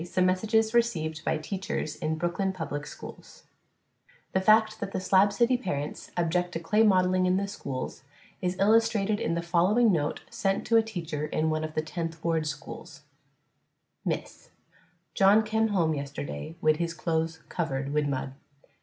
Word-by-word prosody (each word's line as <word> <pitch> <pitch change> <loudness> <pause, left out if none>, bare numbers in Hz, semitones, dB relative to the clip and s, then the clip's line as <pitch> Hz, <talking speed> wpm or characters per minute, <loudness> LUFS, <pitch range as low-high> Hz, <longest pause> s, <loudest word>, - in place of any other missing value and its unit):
SOME 180 +1 +1
MESSAGES 220 +4 +2
RECEIVED 160 -10 0
BY - - 0
TEACHERS 155 -2 -4
IN 160 +1 -1
BROOKLYN 175 +4 -1
PUBLIC 150 -4 -5
SCHOOLS - - -11 0.9
The 190 - +1
fact 215 +2 +4
that 195 -1 -5
the - - -1
"Slab 190 +2 +4
City" 235 +5 +3
parents 150 - -4
object 175 +1 0
to - - -2
clay 210 +6 +2
modeling 185 -3 +4
in 180 +1 +3
the 200 +1 -1
schools 135 -9 -5 0.4
is 180 0 -1
illustrated 215 0 +3
in 165 - -1
the 170 - -2
following 185 +7 +3
note 150 -5 -1
sent 195 -3 -1
to 230 - +4
a - - +6
teacher 165 -9 -4
in 155 +1 0
one 155 0 -1
of 155 0 -5
the 155 - 0
Tenth 165 0 -5
Ward 160 -2 0
schools: 145 -2 -8 1.0
_Miss - - -1 0.2
_: - - -29 0.6
John 200 +3 +5
kem 220 +1 +1
home 170 -7 +1
yesterday 140 - -5
wid 155 0 +3
his 170 0 -2
clothes 160 -2 -2
covered 140 -5 -2
wid 150 -1 +1
mud. 135 -1 -3
175 Hz, 165 wpm, -28 LUFS, 155-200 Hz, 1.0 s, a